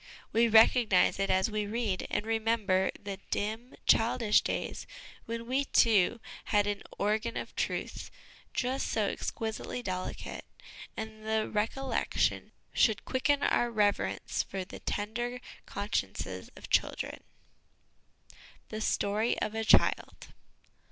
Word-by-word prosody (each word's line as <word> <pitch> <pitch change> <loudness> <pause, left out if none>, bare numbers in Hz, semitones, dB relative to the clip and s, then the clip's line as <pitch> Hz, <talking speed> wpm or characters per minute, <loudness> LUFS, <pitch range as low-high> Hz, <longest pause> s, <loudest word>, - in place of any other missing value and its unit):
We 230 +1 +5
recognise 220 -4 +5
it 195 - 0
as 190 +3 +2
we 210 -1 -1
read, 215 -3 -2
and 210 - -1
remember 220 -4 +1
the 200 -1 -5
dim, 220 +5 -3
childish 225 -1 +4
days - - -3 0.4
when 230 0 -4
we, 265 +3 0
too, 225 -3 +4 0.3
had 205 -1 +2
an 205 -1 -2
' - - -15
organ 215 +3 0
of - - -6
truth - - -3 0.2
' - - -25
just 260 +2 -1
so 215 - +1
exquisitely 225 +2 -4
delicate; 185 -3 -4 0.5
and 220 0 -6
the 220 0 0
recollection 230 +6 0 0.2
should 220 -4 +3
quicken 280 +2 +1
our 240 - +2
reverence 210 -3 0
for 190 -1 -5
the - - -10
tender 240 +4 -3 0.3
consciences 205 +2 -3
of - - -11
children. - - 0 1.5
"The 215 0 -5
Story 215 +2 +1
of 215 - -2
a 225 0 -1
Child." - - +3
220 Hz, 125 wpm, -30 LUFS, 205-235 Hz, 1.5 s, We